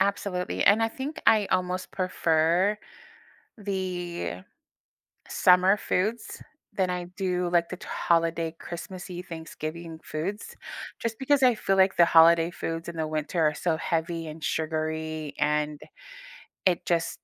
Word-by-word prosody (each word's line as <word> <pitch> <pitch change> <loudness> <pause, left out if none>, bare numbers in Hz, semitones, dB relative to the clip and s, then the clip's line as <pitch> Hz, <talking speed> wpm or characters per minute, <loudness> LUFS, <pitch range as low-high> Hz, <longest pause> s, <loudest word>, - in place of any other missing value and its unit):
Absolutely, 195 -2 0
and 205 +3 +6
I 225 - +3
think 280 +7 -6
I 210 -3 +5
almost 185 0 -1
prefer 180 +2 +1 0.8
the 180 - -4 0.9
summer 185 +2 +5
foods 215 +3 -2 0.3
than 190 -2 0
I 180 -1 -2
do, 180 -2 0
like, 170 -1 +2
the 185 - -5
t - - -12
holiday, 165 -1 0
Christmassy, 180 +1 -7
Thanksgiving 165 -1 -7
foods 190 +8 -5 0.4
just 230 -1 -3
because 275 0 +2
I 250 -2 +6
feel 195 -2 0
like 190 0 +4
the 170 - +7
holiday 165 0 +6
foods 165 -1 -5
in 170 - -6
the 160 -1 -1
winter 155 +2 -1
are 150 - +3
so 170 -3 0
heavy 165 0 -2
and 155 +1 -9
sugary, 155 -1 -2
and 150 0 0 0.9
it 175 -2 +1
just 165 -1 0
175 Hz, 135 wpm, -27 LUFS, 160-190 Hz, 0.9 s, the